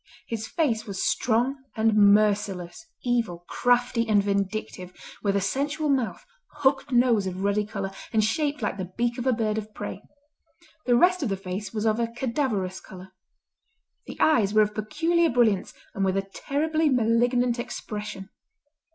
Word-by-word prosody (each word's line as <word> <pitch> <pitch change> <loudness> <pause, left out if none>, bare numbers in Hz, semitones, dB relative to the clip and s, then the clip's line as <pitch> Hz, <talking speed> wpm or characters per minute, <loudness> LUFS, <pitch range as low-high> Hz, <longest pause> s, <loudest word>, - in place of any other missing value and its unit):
His 225 -1 -4
face 235 -9 -1
was 195 -2 -3
strong 245 +4 +1 0.2
and 220 -1 +2
merciless, 205 - +2 0.2
evil, 230 -9 -1
crafty, 245 -1 +1
and 205 -2 +4
vindictive, 200 -2 -2 0.3
with 200 -1 0
a 200 - +2
sensual 290 +9 -1
mouth, 265 - -1 0.4
hooked 270 0 +2
nose 240 -5 +3
of 185 +1 -4
ruddy 200 +1 +1
colour, 195 -2 -4 0.2
and 220 -2 +2
shaped 290 +7 -1
like - - -1
the 185 -1 -5
beak 240 +1 0
of 245 - -3
a - - +5
bird 220 -2 0
of 215 0 -9
prey. 205 -1 -6 0.9
The 245 - +5
rest 360 +7 +4
of 265 - -1
the 195 - -1
face 195 +1 -5
was 215 -1 -3
of 220 +1 +2
a 235 - +1
cadaverous 230 -6 -2
colour. 190 0 -12 0.9
The - - -9
eyes 215 -9 +3
were 215 - +7
of 210 0 -3
peculiar 325 +11 +1
brilliance 230 -6 +2 0.2
and 195 - -2
with 190 0 +1
a 195 - 0
terribly 310 +2 0
malignant 245 0 +2
expression. 210 -4 -6
220 Hz, 160 wpm, -26 LUFS, 200-250 Hz, 0.9 s, were